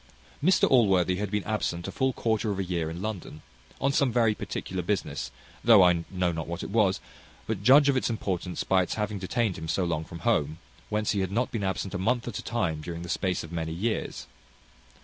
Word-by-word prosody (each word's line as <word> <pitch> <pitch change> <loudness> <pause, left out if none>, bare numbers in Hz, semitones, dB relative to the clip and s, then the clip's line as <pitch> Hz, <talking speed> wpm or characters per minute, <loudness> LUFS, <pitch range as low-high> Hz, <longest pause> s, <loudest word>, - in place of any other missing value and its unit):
Mr 185 +4 +4
Allworthy 95 -7 +4
had 105 0 -2
been 105 0 -1
absent 95 -5 -2
a - - -4
full 130 0 +1
quarter 110 -3 0
of 100 - -1
a 95 - -1
year 85 -3 -2
in 85 +3 -6
London, 95 -7 -5 0.4
on 140 - +2
some 140 -3 +3
very 115 -2 +3
particular 95 -2 -4
business, 85 -9 -2 0.3
though 110 -5 +8
I 85 -2 +3
know 90 -2 0
not 80 -1 -4
what 85 +2 -4
it - - -6
was; 100 -4 +3 0.5
but 110 -3 -3
judge 135 +6 +7
of 140 - +3
its 130 - +1
importance 95 -5 -2
by 95 -1 +3
its 90 - -2
having 105 -1 -2
detained 100 0 -1
him 80 - -6
so 90 +3 0
long 80 -3 -1
from 85 +1 -10
home, 80 -10 +1 0.3
whence 105 0 0
he 105 - 0
had 95 -1 -1
not 120 +5 0
been 110 -4 -2
absent 95 0 -2
a 90 - -2
month 120 +5 0
at 115 - -4
a - - -7
time 95 -10 -1
during 85 +1 -6
the 90 - -8
space 90 +2 -1
of 80 - -10
many 80 -1 -3
years. 110 +7 -2
95 Hz, 225 wpm, -27 LUFS, 85-110 Hz, 0.5 s, though